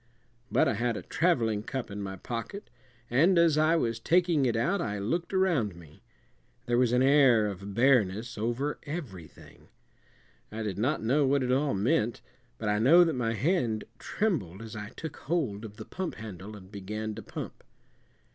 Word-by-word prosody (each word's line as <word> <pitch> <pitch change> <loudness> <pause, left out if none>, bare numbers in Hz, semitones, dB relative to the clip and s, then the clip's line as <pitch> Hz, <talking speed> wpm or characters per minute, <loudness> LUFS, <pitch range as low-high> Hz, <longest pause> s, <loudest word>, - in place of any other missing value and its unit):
But - - +3
I - - +2
had 115 +1 -1
a - - -7
traveling 115 -12 +1
cup 130 0 -5
in 100 +1 -5
my 95 -1 -5
pocket, 120 - -6 0.4
and 165 +9 +4
as 170 -3 +5
I 155 +2 +3
was 115 -8 0
taking 170 0 +2
it 120 - 0
out 170 - +1
I 105 -2 -2
looked 165 - -2
around 170 - +1
me. 80 -3 -15 0.6
There 120 -1 +1
was 125 -2 +3
an 125 +1 +3
air 135 -5 +5
of 100 0 -5
bareness 120 -3 +2
over 120 +7 -2
everything. 120 - -9 0.8
I 110 +1 -4
did 100 -2 -4
not 130 +3 0
know 135 +5 +2
what 140 0 +2
it 125 - 0
all 135 0 +1
meant, 115 +3 +1 0.4
but 110 - -4
I 105 0 +2
know 160 +10 +7
that 165 -2 +1
my 115 -3 -1
hand 120 - 0 0.2
trembled 130 - -2
as 110 -2 -9
I 105 -1 -6
took 160 +5 -8
hold 135 -11 -2
of 105 -1 -9
the 110 - -8
pump 185 -2 -5
handle 105 -1 -8
and 95 -2 -13
began 105 +2 -5
to - - -7
pump. - - -8
120 Hz, 180 wpm, -29 LUFS, 105-150 Hz, 0.8 s, know